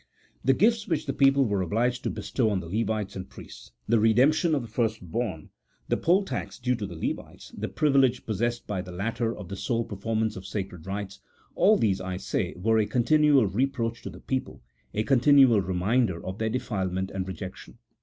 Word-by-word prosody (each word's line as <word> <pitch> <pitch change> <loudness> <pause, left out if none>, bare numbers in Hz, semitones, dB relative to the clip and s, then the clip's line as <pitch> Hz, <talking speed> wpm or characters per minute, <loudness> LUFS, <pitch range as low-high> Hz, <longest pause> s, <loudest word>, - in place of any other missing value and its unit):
The 135 - +4
gifts 220 - +2
which 155 -3 -1
the 135 - -2
people 135 0 +4
were 100 -4 0
obliged 120 +7 0
to - - +1
bestow 120 -5 -1
on 100 -3 0
the 90 - -8
Levites 110 +1 -2
and 95 -1 -7
priests - - -12
— 60 - -44
the 115 - +3
redemption 135 +9 +4
of 135 - -1
the - - -8
firstborn, 110 -6 -3 0.4
the - - +3
poll 185 +4 +3
tax - - -5
due 125 0 0
to 105 -3 -4
the 90 - -9
Levites, 80 - -5
the - - -3
privilege 135 -5 +2
possessed 120 +3 -2
by 100 -3 -3
the 90 0 -9
latter 115 +5 -2
of 100 - -8
the 100 - -6
sole 115 +4 -1
performance 110 +2 -2
of 95 0 -8
sacred 95 -5 -5
rites 100 0 -5 0.2
— - - -34
all 215 +2 +4
these, 95 -4 +1
I 95 0 -4
say, - - -2
were 110 +4 +2
a 105 - +1
continual 145 +1 +4
reproach 115 +3 -1
to - - -6
the - - -12
people, 130 - -4 0.3
a 105 - -1
continual 135 -3 +5
reminder 95 +2 0
of 95 +2 -5
their 110 0 0
defilement 95 -5 -2
and 95 -1 -4
rejection. 95 -4 -8
110 Hz, 200 wpm, -27 LUFS, 95-130 Hz, 0.4 s, continual